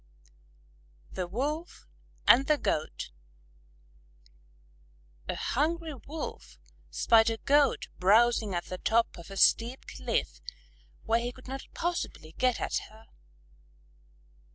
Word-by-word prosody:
_ -, -, -18 dB
THE 185 Hz, -2 st, -3 dB
WOLF 295 Hz, -, -4 dB, 0.4 s
AND 265 Hz, +3 st, +7 dB
THE 300 Hz, -, +4 dB
GOAT 155 Hz, -, -2 dB, 2.2 s
A -, -, -1 dB
hungry 320 Hz, +4 st, -1 dB
Wolf 290 Hz, +4 st, -8 dB, 0.3 s
spied 225 Hz, 0 st, +4 dB
a 225 Hz, -, -2 dB
Goat 285 Hz, +1 st, +2 dB
browsing 215 Hz, +1 st, +4 dB
at 175 Hz, -, -2 dB
the 185 Hz, -, -6 dB
top 230 Hz, +1 st, +1 dB
of 170 Hz, 0 st, -11 dB
a 195 Hz, -, -8 dB
steep 235 Hz, +6 st, +3 dB
cliff -, -, -3 dB, 0.6 s
where 230 Hz, 0 st, +2 dB
he 240 Hz, +1 st, -3 dB
could 255 Hz, +1 st, -15 dB
not 270 Hz, +1 st, -6 dB
possibly 340 Hz, -, -3 dB
get 255 Hz, -1 st, +2 dB
at -, -, -1 dB
her. 220 Hz, +1 st, -17 dB
240 Hz, 115 wpm, -29 LUFS, 215-285 Hz, 2.2 s, AND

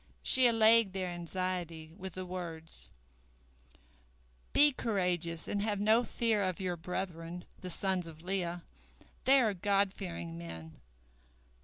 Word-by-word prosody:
She 260 Hz, -1 st, +7 dB
allayed 225 Hz, -3 st, +5 dB
their 185 Hz, -1 st, -2 dB
anxiety 175 Hz, -2 st, -4 dB
with 190 Hz, -2 st, -8 dB
the 185 Hz, 0 st, -4 dB
words: 170 Hz, -3 st, -6 dB, 1.6 s
"Be 295 Hz, 0 st, +6 dB
courageous 180 Hz, -, -1 dB
and 205 Hz, -, -1 dB
have 205 Hz, -1 st, 0 dB
no 220 Hz, +4 st, +4 dB
fear 230 Hz, -3 st, +1 dB
of 185 Hz, -3 st, -1 dB
your 185 Hz, -2 st, -1 dB
brethren, 175 Hz, 0 st, -5 dB
the 185 Hz, -, -6 dB
sons 185 Hz, -1 st, 0 dB
of 160 Hz, 0 st, -11 dB
Leah. 175 Hz, -2 st, -2 dB, 0.6 s
They 270 Hz, +1 st, +7 dB
are 220 Hz, -5 st, +2 dB
God 200 Hz, +1 st, +1 dB
fearing 85 Hz, 0 st, -6 dB
men. 80 Hz, -1 st, -9 dB
185 Hz, 130 wpm, -32 LUFS, 165-205 Hz, 1.6 s, She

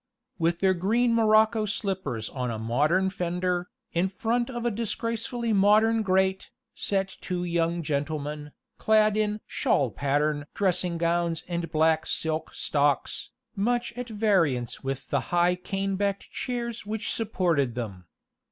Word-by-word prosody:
With 170 Hz, +1 st, +1 dB
their 190 Hz, -1 st, +4 dB
green 230 Hz, +7 st, +2 dB
morocco 220 Hz, -1 st, +4 dB
slippers 190 Hz, -, -2 dB
on 125 Hz, -2 st, -3 dB
a 115 Hz, -, -3 dB
modern 150 Hz, +12 st, +1 dB
fender, 180 Hz, 0 st, -1 dB, 0.2 s
in 175 Hz, +3 st, +1 dB
front 235 Hz, +5 st, -1 dB
of 240 Hz, -2 st, -4 dB
a 240 Hz, -, +2 dB
disgracefully 230 Hz, +1 st, -2 dB
modern 215 Hz, +3 st, +4 dB
grate, 190 Hz, -1 st, +1 dB, 0.2 s
sat 195 Hz, -1 st, -1 dB
two 180 Hz, -1 st, -3 dB
young 170 Hz, -1 st, 0 dB
gentlemen, 150 Hz, 0 st, -3 dB, 0.3 s
clad 215 Hz, -1 st, +4 dB
in 215 Hz, 0 st, 0 dB
"shawl 130 Hz, -5 st, +1 dB
pattern" 145 Hz, +4 st, 0 dB
dressing 180 Hz, -3 st, +1 dB
gowns 170 Hz, 0 st, 0 dB
and 170 Hz, -2 st, -3 dB
black 160 Hz, 0 st, +2 dB
silk 160 Hz, 0 st, -2 dB
stocks, 145 Hz, -1 st, 0 dB, 0.3 s
much 240 Hz, +4 st, 0 dB
at 245 Hz, 0 st, -5 dB
variance 180 Hz, -, +1 dB
with 135 Hz, 0 st, -4 dB
the -, -, +3 dB
high 175 Hz, 0 st, +3 dB
cane 195 Hz, +1 st, -2 dB
backed 200 Hz, 0 st, -2 dB
chairs 235 Hz, -2 st, -4 dB
which 215 Hz, +1 st, -3 dB
supported 170 Hz, -, 0 dB
them. 100 Hz, -7 st, -5 dB
185 Hz, 135 wpm, -27 LUFS, 155-215 Hz, 0.3 s, their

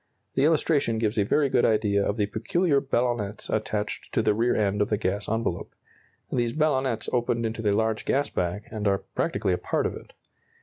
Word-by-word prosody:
The 135 Hz, -, +2 dB
illustration 150 Hz, -6 st, +2 dB
gives 110 Hz, 0 st, 0 dB
a -, -, +4 dB
very 140 Hz, +8 st, +2 dB
good 125 Hz, -, +2 dB
idea 105 Hz, -2 st, +2 dB
of 100 Hz, -, -1 dB
the 105 Hz, -, +2 dB
peculiar 140 Hz, -, +1 dB
ballonnets 120 Hz, -6 st, -1 dB
attached 105 Hz, -1 st, -2 dB
to -, -, +3 dB
the -, -, +3 dB
rear 115 Hz, +3 st, +1 dB
end 105 Hz, -1 st, +1 dB
of 105 Hz, -, +1 dB
the 105 Hz, -, +1 dB
gas 100 Hz, 0 st, -2 dB
envelope. 110 Hz, -5 st, -2 dB, 0.6 s
These 120 Hz, -2 st, 0 dB
ballonnets 135 Hz, -7 st, 0 dB
open 120 Hz, -1 st, +1 dB
into 110 Hz, 0 st, -3 dB
the 105 Hz, -2 st, +2 dB
large 110 Hz, -1 st, 0 dB
gas 140 Hz, +1 st, +1 dB
bag, 90 Hz, +4 st, -2 dB
and 105 Hz, -2 st, -2 dB
are 100 Hz, -1 st, +1 dB
practically 95 Hz, -, 0 dB
a 90 Hz, -, -1 dB
part -, -, -1 dB
of -, -, -1 dB
it. -, -, -11 dB
110 Hz, 200 wpm, -26 LUFS, 105-125 Hz, 0.6 s, a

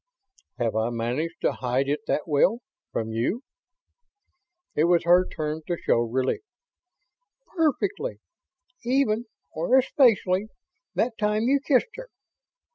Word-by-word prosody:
"Have 115 Hz, -3 st, -1 dB
I 110 Hz, +1 st, +1 dB
managed 120 Hz, +8 st, -3 dB
to -, -, +2 dB
hide 130 Hz, +2 st, -1 dB
it 145 Hz, +2 st, 0 dB
that 150 Hz, -, 0 dB
well? 190 Hz, -, +2 dB, 0.3 s
From 110 Hz, 0 st, -3 dB
you?" 120 Hz, -, -1 dB, 1.3 s
It 155 Hz, -, +2 dB
was 175 Hz, 0 st, +3 dB
her 180 Hz, +2 st, +5 dB
turn 155 Hz, 0 st, -4 dB
to 175 Hz, -, -1 dB
show -, -, +1 dB
relief. 125 Hz, -, -1 dB, 1.1 s
"Perfectly. 380 Hz, -, 0 dB, 0.6 s
Even 240 Hz, -2 st, +1 dB, 0.3 s
or 170 Hz, +12 st, +2 dB
especially 220 Hz, -7 st, +3 dB, 0.5 s
that 230 Hz, 0 st, 0 dB
time 210 Hz, +1 st, +1 dB
you 275 Hz, +4 st, +3 dB
kissed 280 Hz, -, +1 dB
her. -, -, -8 dB
180 Hz, 120 wpm, -25 LUFS, -, 1.3 s, her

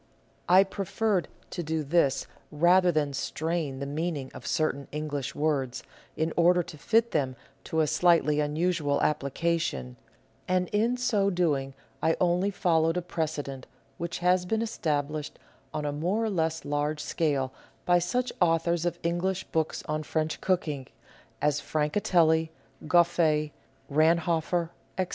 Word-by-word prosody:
I 185 Hz, +2 st, +8 dB
preferred 195 Hz, -1 st, -1 dB, 0.2 s
to 175 Hz, -, -3 dB
do 160 Hz, -1 st, -2 dB
this 145 Hz, -2 st, +2 dB, 0.3 s
rather 175 Hz, +4 st, +4 dB
than 150 Hz, -3 st, 0 dB
strain 155 Hz, 0 st, -2 dB
the 140 Hz, -, -4 dB
meaning 145 Hz, -1 st, -3 dB
of -, -, -9 dB
certain 140 Hz, -3 st, 0 dB
English 150 Hz, -2 st, -4 dB
words, 140 Hz, -5 st, -1 dB, 0.3 s
in 160 Hz, +1 st, 0 dB
order 175 Hz, +1 st, +4 dB
to 155 Hz, -, -10 dB
fit 230 Hz, +7 st, +2 dB
them 135 Hz, -4 st, 0 dB, 0.3 s
to 160 Hz, -, 0 dB
a -, -, +3 dB
slightly 155 Hz, -1 st, +3 dB
unusual 150 Hz, -1 st, 0 dB
application; 145 Hz, -, -1 dB, 0.5 s
and 180 Hz, -1 st, +1 dB
in 230 Hz, +4 st, +1 dB
so 215 Hz, -6 st, +2 dB
doing 145 Hz, -7 st, 0 dB, 0.3 s
I 165 Hz, -, +2 dB
only 180 Hz, +2 st, +2 dB
followed 165 Hz, -4 st, +2 dB
a -, -, 0 dB
precedent 150 Hz, -6 st, -4 dB, 0.3 s
which 170 Hz, 0 st, -3 dB
has 180 Hz, 0 st, +2 dB
been 220 Hz, +3 st, 0 dB
established 150 Hz, -7 st, -2 dB, 0.3 s
on 150 Hz, 0 st, -3 dB
a 145 Hz, -, 0 dB
more 180 Hz, +10 st, -1 dB
or 220 Hz, -, -1 dB
less 160 Hz, -3 st, -1 dB
large 145 Hz, +1 st, -1 dB
scale 140 Hz, -5 st, -1 dB, 0.3 s
by 175 Hz, 0 st, +4 dB
such 245 Hz, +8 st, -1 dB
authors 170 Hz, 0 st, +2 dB
of 175 Hz, -, -2 dB
English 175 Hz, +3 st, 0 dB
books 160 Hz, -1 st, -1 dB
on 155 Hz, 0 st, -1 dB
French 155 Hz, +1 st, -2 dB
cooking 155 Hz, -8 st, -1 dB, 0.6 s
as 145 Hz, 0 st, +2 dB
Francatelli, 160 Hz, 0 st, +2 dB, 0.4 s
Gouff^, 160 Hz, -3 st, +3 dB, 0.4 s
Ranhoffer, 165 Hz, +2 st, +2 dB, 0.3 s
etc. 185 Hz, -1 st, 0 dB
160 Hz, 140 wpm, -28 LUFS, 150-175 Hz, 0.6 s, I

